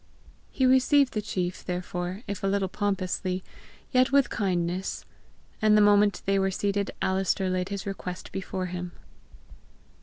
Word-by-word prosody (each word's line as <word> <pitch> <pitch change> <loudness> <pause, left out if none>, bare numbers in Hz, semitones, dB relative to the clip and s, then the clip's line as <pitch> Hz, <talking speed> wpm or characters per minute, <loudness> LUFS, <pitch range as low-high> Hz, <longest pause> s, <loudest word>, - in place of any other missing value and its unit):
He 260 - 0
received 260 +1 +4
the 215 - -1
Macruadh, 180 -2 -3
therefore, 180 +2 -4
if 200 -2 -5
a - - +2
little 195 0 +1
pompously, 185 -2 -2 0.5
yet 255 0 +3
with 280 -2 +4
kindness. 185 -2 -1 0.6
And 215 -1 +5
the 210 - +6
moment 205 0 +4
they 195 0 +2
were 195 0 +2
seated 200 +1 -1
Alister 190 0 +1
laid 185 0 -1
his 200 0 -4
request 185 -2 -6
before 190 -1 -4
him. 180 -1 -5
195 Hz, 145 wpm, -27 LUFS, 185-205 Hz, 0.6 s, the